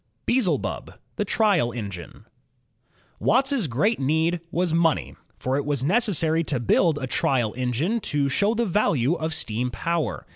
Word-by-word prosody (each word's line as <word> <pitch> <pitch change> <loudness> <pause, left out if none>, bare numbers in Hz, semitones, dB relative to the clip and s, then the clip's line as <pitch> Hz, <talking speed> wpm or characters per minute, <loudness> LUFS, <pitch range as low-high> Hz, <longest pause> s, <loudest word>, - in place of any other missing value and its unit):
Beelzebub, 240 -7 -1 0.2
the - - 0
Trial 195 - +2
Engine 100 -7 -8 0.9
Watt's 260 - +2
great 155 - +1
need 160 +5 +1
was 175 -1 0
money, 165 -2 +1 0.2
for 130 +1 -1
it 145 - -1
was 145 -3 -1
necessary 165 - +1
to 135 -5 -1
build 150 - +2
a 140 - -3
trial 125 -3 0
engine 130 - -1
to 145 -8 0
show 200 - +1
the 235 +1 +1
value 165 - +1
of 160 -2 -3
steam 125 -5 -2
power. 165 +7 -2
160 Hz, 145 wpm, -24 LUFS, 130-195 Hz, 0.9 s, Trial